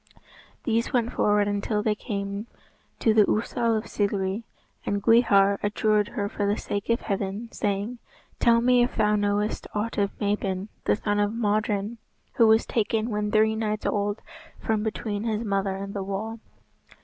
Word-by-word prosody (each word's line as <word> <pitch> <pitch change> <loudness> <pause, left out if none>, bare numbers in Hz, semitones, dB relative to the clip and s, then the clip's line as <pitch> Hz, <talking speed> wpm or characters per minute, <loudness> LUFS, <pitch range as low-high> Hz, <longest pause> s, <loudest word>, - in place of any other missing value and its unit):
These 230 -3 0
went 240 -3 +1
forward 205 0 +2
until 205 +1 -1
they 215 - +2
came 200 -1 -4 0.5
to 220 - +3
the 215 -1 +6
Ousel 230 +1 +1
of 215 - -3
Cilgwri, 200 0 -1 0.4
and 200 - -1
Gwrhyr 200 -3 +4
adjured 210 0 +2
her 220 -4 -3
for 205 -1 -2
the 205 +1 +1
sake 200 +2 -4
of 230 - +2
Heaven, 200 +3 -3
saying, 205 +4 -2 0.4
"Tell 230 -1 +4
me 250 0 +4
if 240 - 0
thou 210 -1 +3
knowest 205 +1 0
aught 210 +1 -1
of 200 -1 -1
Mabon, 200 -1 -1 0.2
the - - +3
son 205 0 -1
of 205 +2 +1
Modron, 215 0 0 0.3
who 230 - +5
was 220 +1 +5
taken 225 +1 0
when 210 0 -1
three 220 +1 +3
nights 215 -1 -2
old 205 +1 -1 0.3
from 220 -1 -1
between 210 -1 -3
his 220 0 -1
mother 195 -2 0
and 200 +1 -6
the 200 - -3
wall." 205 +4 -4
210 Hz, 165 wpm, -26 LUFS, 205-225 Hz, 0.5 s, the